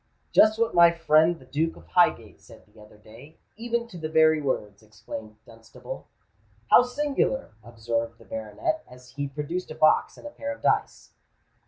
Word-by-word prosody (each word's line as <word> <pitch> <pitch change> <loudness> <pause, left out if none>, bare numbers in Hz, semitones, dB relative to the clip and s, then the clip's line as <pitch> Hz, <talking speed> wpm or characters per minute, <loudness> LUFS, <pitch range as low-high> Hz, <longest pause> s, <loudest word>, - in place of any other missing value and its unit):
"Just 215 0 +5
what 230 0 0
my 170 0 +7
friend 165 0 +3
the 130 - -17
Duke 160 +5 -2
of 85 - -16
Highgate 80 - +1
said - - -16
the 105 +1 -20
other 105 0 -17
day—even 160 - -7
to 180 - -10
the 155 -1 -4
very 155 -1 +4
words," 105 -7 -3
exclaimed 110 0 -10
Dunstable. 115 0 -11 0.6
"How - - +9
singular!" 270 +1 -1
observed 115 0 -4
the - - -18
baronet, 110 - -4
as 125 -1 -15
he 140 +2 -4
produced 150 +6 -5
a 155 - -8
box 155 - +3
and - - -14
a 295 - -7
pair 285 -1 -5
of - - -22
dice. - - -1
150 Hz, 170 wpm, -25 LUFS, 115-180 Hz, 0.6 s, How